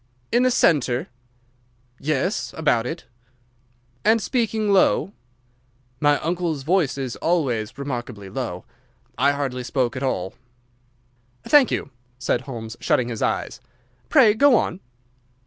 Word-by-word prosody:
"In 240 - +3
the 255 - +4
centre?" 135 - +2 0.9
"Yes, 155 +7 -1
about 125 -7 +1
it." 160 0 -6 1.0
"And 220 +2 +4
speaking 220 -3 0
low?" 195 0 +3 0.9
"My 145 -1 +3
uncle's 165 -3 -2
voice 165 -3 +1
is 130 -3 -4
always 135 -12 -1
remarkably 120 -7 -5
low. 95 -4 -5 0.5
I 140 +4 +3
hardly 135 -3 -3
spoke 125 -1 -1
at 130 - -4
all." 95 -9 -2 1.1
"Thank 290 -4 +5
you," 140 - -3 0.3
said 125 -1 0
Holmes, 115 -4 -7
shutting 125 -1 +1
his 115 -3 -5
eyes; - - -2 0.5
"pray 245 -8 +6
go 275 +3 +5
on." 185 -4 0
140 Hz, 120 wpm, -23 LUFS, 125-190 Hz, 1.1 s, pray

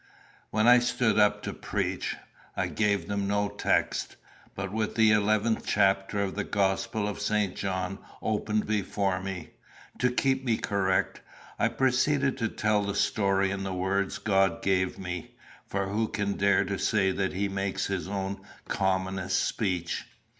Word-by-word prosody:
When 110 +1 +2
I 125 0 +8
stood 120 -2 +1
up 105 0 +3
to - - -3
preach, - - -2 0.4
I - - +1
gave 105 -2 0
them 100 -1 -1
no 100 0 +1
text; 100 - 0 0.4
but, 95 -1 -4
with 110 0 -2
the 110 -1 +5
eleventh 105 +1 +2
chapter 100 0 +2
of 95 - -2
the 105 - -2
Gospel 100 +2 0
of 105 0 -4
St. 105 -3 0
John 95 0 -3 0.2
open 110 0 0
before 100 -2 -1
me, 95 -2 -6 0.5
to 125 - +3
keep 135 +1 +1
me 115 -4 +1
correct, 95 -2 0 0.4
I - - +4
proceeded 135 +1 +2
to 115 - +1
tell 105 -1 +1
the 100 0 -2
story 100 -2 +2
in 100 0 -3
the 95 -1 -3
words 95 +1 0
God 95 -2 +1
gave 95 -1 +1
me; 90 -3 -6 0.3
for 100 0 -1
who 110 +2 0
can 105 -2 -1
dare 100 -1 +3
to 100 -1 -3
say 95 -3 +2
that 95 0 -1
he 100 +2 0
makes 95 0 -2
his 95 -2 -2
own 100 0 -3 0.3
commonest 95 -1 0
speech? 90 -6 -2
100 Hz, 160 wpm, -28 LUFS, 95-105 Hz, 0.5 s, I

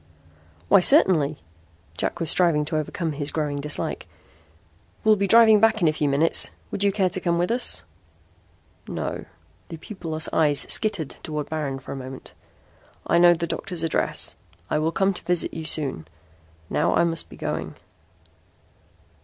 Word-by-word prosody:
"Why, 200 - +6
certainly." 175 - +5 0.6
Jack - - -3
was 165 - -2
striving 165 -5 +2
to 155 +1 -4
overcome 160 +2 -3
his 145 0 -2
growing 150 -2 -2
dislike. 150 0 -3 1.0
"We'll 215 -1 +5
be 200 -1 -1
driving 220 0 +6
back 225 +1 +3
in 170 - +2
a 155 - +2
few 150 -1 -1
minutes. 150 +4 +3 0.2
Would 200 - -3
you 200 - +3
care 190 -2 0
to 185 - -3
come 170 -1 0
with 175 +4 0
us?" 245 +1 +1 1.0
"No." - - -5 0.4
The 165 - -8
pupilless 160 -3 -4
eyes 145 -3 +2
skittered 200 -9 -1
toward 150 -1 -5
Baron 150 -4 -3
for 135 - -10
a - - -5
moment. 130 0 -9 0.7
"I 170 - +2
know 175 0 +6
the 170 +1 -3
doctor's 170 0 -3
address. 165 - -1 0.4
I 150 - +1
will 160 +1 0
come 195 +3 +1
to - - -7
visit 180 -1 -1
you 160 -1 -6
soon. 140 - -2 0.6
Now - - 0
I - - +3
must 165 -1 -1
be - - -13
going." - - -4
165 Hz, 160 wpm, -23 LUFS, 150-185 Hz, 1.0 s, Why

